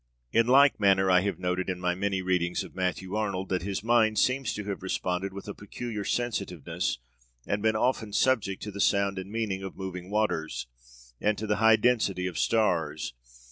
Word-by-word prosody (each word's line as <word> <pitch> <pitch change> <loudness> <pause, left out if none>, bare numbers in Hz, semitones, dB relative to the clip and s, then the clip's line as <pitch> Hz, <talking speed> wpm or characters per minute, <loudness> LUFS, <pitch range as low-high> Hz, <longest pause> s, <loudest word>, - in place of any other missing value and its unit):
In 115 0 +3
like 140 +1 +6
manner 95 -2 +4
I 90 0 +6
have 100 +1 -2
noted 90 +1 -2
in 90 -1 -2
my 90 0 0
many 95 0 -1
readings 90 -1 0
of - - -11
Matthew 95 0 -2
Arnold 100 -3 -2
that 90 -1 0
his 100 +2 -3
mind 110 -2 +3
seems 130 +1 +2
to 105 - -4
have 100 -1 -4
responded 95 0 -2
with 100 +1 -9
a 105 - -4
peculiar 105 +1 -6
sensitiveness, 90 - -2 0.5
and 100 0 -1
been 110 0 +2
often 110 -2 0
subject 105 -5 +1
to 105 - -5
the 100 +1 -4
sound 100 -1 +2
and 95 +2 -8
meaning 105 -4 -2
of 95 -1 -7
moving 90 -1 -6
waters, 105 - -1 0.5
and 105 0 +1
to 110 - -4
the 105 -1 0
high 110 +1 +6
destiny 110 -6 +1
of 90 -3 -3
stars. 85 - +1
100 Hz, 190 wpm, -28 LUFS, 95-110 Hz, 0.5 s, like